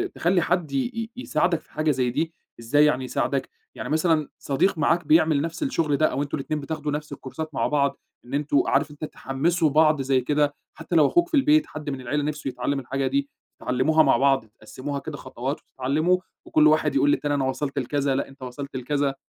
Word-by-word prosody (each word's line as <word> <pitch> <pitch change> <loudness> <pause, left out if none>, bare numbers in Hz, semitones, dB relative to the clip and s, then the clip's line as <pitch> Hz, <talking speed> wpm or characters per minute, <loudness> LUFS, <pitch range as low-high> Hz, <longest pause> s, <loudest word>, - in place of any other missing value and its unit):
تخلّي 175 +1 +2
حد 170 -3 0
ي-ي 225 - -2
يساعدك 180 -8 0
في - - -27
حاجة 155 0 +1
زي 130 -3 0
دي؟ 160 +6 -2 0.3
إزاي 145 +6 +3
يعني 130 -3 +1
يساعدك، 135 +1 -1 0.3
يعني - - -6
مثلًا 155 -1 +1
صديق 145 +7 +1
معاك 165 +2 +1
بيعمل 155 -2 +4
نَفْس 165 - -3
الشغل 165 - 0
ده، 155 - +3
أو 135 +2 -1
أنتم 140 - -3
الاتنين 150 +2 -3
بتاخدوا 150 0 -4
نَفْس 150 +1 -4
الكورسات 155 +4 -7
مع - - +1
بعض 140 -2 +1 0.3
إن 120 - -11
أنتم 145 0 +2
عارف 145 +2 +1
أنت 150 +1 -6
تحمِّسوا 155 +4 0
بعض 155 0 +4
زي 135 -1 +2
كده، 145 +2 +1 0.2
حتى 175 - -5
لو 155 -3 +6
أخوك 345 0 +2
في 350 - -23
البيت، 300 +2 +4
حد 150 -1 -6
من 135 -2 -4
العِيلة 145 +4 -1
نِفسه 150 -1 -3
يتعلِّم 135 +2 -2
الحاجة 135 +1 -2
دي، 140 +1 0 0.3
تتعلّموها 155 +6 +3
مع - - +4
بعض، 135 -2 +3
تقسّموها 130 +6 -7
كده 150 +1 -7
خطوات 130 +2 -5
وتتعلّموا، 155 +8 0 0.3
وكُلّ 155 0 +4
واحد 155 0 +2
يقول 145 - +4
للتاني 145 0 0
أنا 140 -2 +1
وصَلت 135 +1 -2
لكذا، 140 +1 0
لأ 135 - -1
أنت 135 0 -17
وصَلت 130 +2 -7
لكذا، 140 +2 -1
145 Hz, 200 wpm, -24 LUFS, 135-155 Hz, 0.3 s, لو